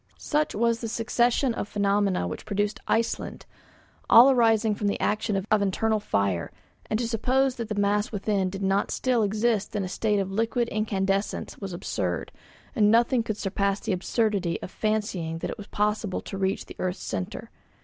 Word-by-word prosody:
Such 300 0 -1
was 230 +1 +1
the 230 - -3
succession 240 +3 +1
of 205 - -4
phenomena 200 - +1
which 90 - -7
produced 205 +1 -1
Iceland, 230 0 -1 0.6
all 250 +4 +9
arising 225 -3 +3
from 205 0 -2
the 200 - 0
action 210 -2 0
of 215 -1 +4
internal 215 +3 +1
fire; 100 - -1 0.4
and 215 - +1
to 235 0 -1
suppose 255 +3 +1
that 230 -2 -4
the 210 - -2
mass 205 +3 +1
within 200 -2 0
did 195 +1 -6
not 195 +1 +1
still 250 -3 +1
exist 215 +1 0
in 205 - 0
a - - -3
state 210 +3 0
of 195 -1 -1
liquid 230 +3 0
incandescence 200 -2 -1
was 195 -2 -5
absurd; 95 - -3 0.4
and 210 -1 +4
nothing 235 +2 +4
could 215 -2 -3
surpass 200 0 0
the - - -2
absurdity 195 -2 0
of - - -7
fancying 205 -7 -1
that - - -4
it - - -7
was 205 - -8
possible 210 -2 -1
to - - -7
reach 195 0 -1
the - - -11
earth's 185 0 -2
centre. 90 -1 -5
210 Hz, 180 wpm, -26 LUFS, 195-225 Hz, 0.6 s, all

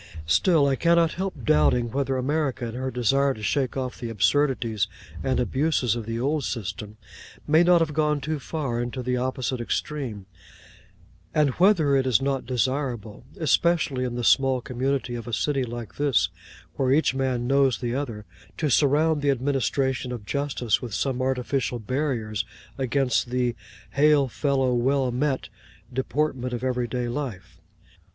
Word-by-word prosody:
Still, 145 - +4
I 140 -1 +2
cannot 170 +1 +3
help 185 -8 -4
doubting 110 +10 +3
whether 135 0 -1
America, 135 -1 -1
in 115 - -6
her 130 +2 -3
desire 135 +3 +2
to 110 - -10
shake 135 +3 0
off 130 -1 -4
the 120 - -4
absurdities 115 -1 +1 0.4
and 130 - +1
abuses 130 -2 +1
of 115 -2 -5
the 115 0 -3
old 145 +4 0
system, 105 -1 -5 0.5
may 155 +2 +5
not 175 -1 +5
have 155 -2 0
gone 150 -1 +1
too 150 +2 -3
far 135 -5 -3
into 125 +1 -4
the 125 0 0
opposite 130 0 -2
extreme; 120 -5 -3 1.1
and 150 -3 +3
whether 170 -3 +4
it 135 -1 +2
is 120 -5 +4
not 135 -1 -2
desirable, 125 -3 -2
especially 160 -4 +2
in 125 -1 -3
the 120 - -3
small 135 +1 +4
community 130 0 -2
of 120 0 -6
a 120 - -5
city 140 +1 0
like 120 -2 -7
this, 140 -11 +2 0.5
where 130 -1 +1
each 145 -1 +3
man 130 -2 -1
knows 135 0 +3
the 120 -1 -3
other, 120 -6 -4 0.3
to 150 -3 0
surround 150 +4 +3
the 145 - +1
administration 135 -1 0
of 120 -4 -6
justice 135 -4 -1
with 120 -5 -5
some 130 +1 -1
artificial 130 -1 -1
barriers 115 -3 -2 0.3
against 130 -1 0
the 125 -1 0 0.4
'Hail 145 -1 +4
fellow, 135 -1 +1
well 130 +1 +1
met' 130 +2 -1 0.4
deportment 130 -1 -1
of 120 +1 -4
everyday 125 -1 -1
life. 120 -6 -5
130 Hz, 155 wpm, -25 LUFS, 120-145 Hz, 1.1 s, may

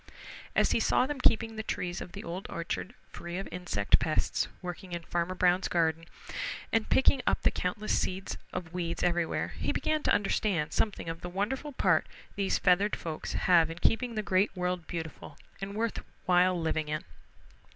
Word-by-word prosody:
As - - +4
he - - +3
saw 250 - +3
them 290 0 -4
keeping 225 -1 +3
the - - -1
trees 180 -4 -3
of - - -8
the - - -7
Old 175 +3 -5
Orchard 170 +6 -4 0.2
free 175 +1 -6
of 195 - -4
insect 175 - +2
pests 155 -1 +1
working 180 0 -7
in 170 -1 -3
Farmer 175 +2 -1
Brown's 180 +1 +3
garden, 165 -1 +1 0.7
and 225 -1 +2
picking 265 0 +4
up - - +2
the - - +4
countless 210 +4 -1
seeds 190 +1 -2 0.2
of 175 -2 -5
weeds 170 -2 -2
everywhere, 175 -2 +1
he - - 0
began 310 0 0
to - - +1
understand 195 -5 +1
something 210 -5 0
of 165 0 -4
the 175 - -5
wonderful 245 - -2
part - - +3 0.3
these 195 -1 +1
feathered 195 +4 +3
folks 160 -2 -5
have 170 -3 +4
in 165 - -6
keeping 230 +5 +1
the 215 - -1
Great 190 +1 +3
World 180 -2 -2
beautiful 160 -3 -6 0.2
and 200 +1 -4
worth 225 +1 -1 0.3
while 180 -1 +4
living 160 -1 0
in. 155 0 -2
180 Hz, 180 wpm, -30 LUFS, 170-205 Hz, 0.7 s, As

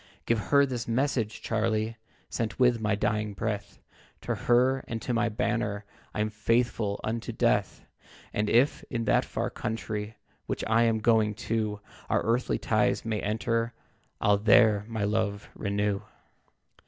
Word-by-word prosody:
"Give 115 -1 +2
her 140 -1 +6
this 125 -3 -4
message, 115 -2 0
Charlie, 110 0 0 0.3
Sent 115 -2 -3
with 125 -3 +3
my 105 -1 +1
dying 105 0 -1
breath, 105 0 -3 0.4
To - - -2
her 125 +2 +3
and 115 - -3
to 125 - -1
my 115 0 +2
banner 110 -3 -1 0.3
I'm 105 0 0
'faithful 110 -1 0
unto 115 +1 -3
death.' - - 0 0.5
And 105 0 0
if, 125 +5 +3
in 115 -2 -2
that - - +3
far - - -3
country 110 -1 -4 0.3
Which - - -2
I 115 +1 +3
am 110 -1 +1
going 110 -2 +3 0.2
to, 105 -2 0 0.3
Our - - +2
earthly 115 - +1
ties - - +1
may 110 -2 -1
enter, 115 +3 -1 0.4
I'll 105 0 +4
there 105 0 +5
my 110 -2 -3
love 105 -1 -1
renew. 100 0 -1
110 Hz, 145 wpm, -28 LUFS, 105-115 Hz, 0.5 s, her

